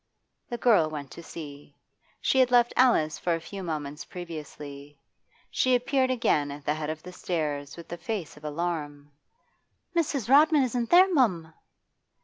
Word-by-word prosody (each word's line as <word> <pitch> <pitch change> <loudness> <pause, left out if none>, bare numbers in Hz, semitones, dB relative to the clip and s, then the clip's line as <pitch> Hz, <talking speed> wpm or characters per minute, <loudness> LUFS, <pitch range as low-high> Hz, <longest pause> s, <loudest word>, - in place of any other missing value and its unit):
The 240 - -3
girl 210 -10 +4
went 145 -3 -7
to - - -9
see. 145 -3 -10 0.4
She 265 - +2
had 255 -1 +5
left 240 -1 +4
Alice 160 -12 +3
for 175 -1 0
a - - -4
few 195 +4 -8
moments 150 -3 -4
previously. 145 -4 -9 0.5
She 255 -1 +3
appeared 260 +1 +1
again 190 - +1
at 140 0 -9
the 150 - +1
head 155 -1 -4
of 155 0 -5
the 180 - -10
stairs 150 -6 -3
with 170 0 -9
a - - -5
face 175 -1 -5
of 150 - -16
alarm. 150 -2 -4 0.8
'Mrs. 290 -8 0
Rodman 295 +2 +6
isn't 245 -2 -1
there, 370 +2 +6
mum! 180 - +1
170 Hz, 160 wpm, -27 LUFS, 150-245 Hz, 0.8 s, Rodman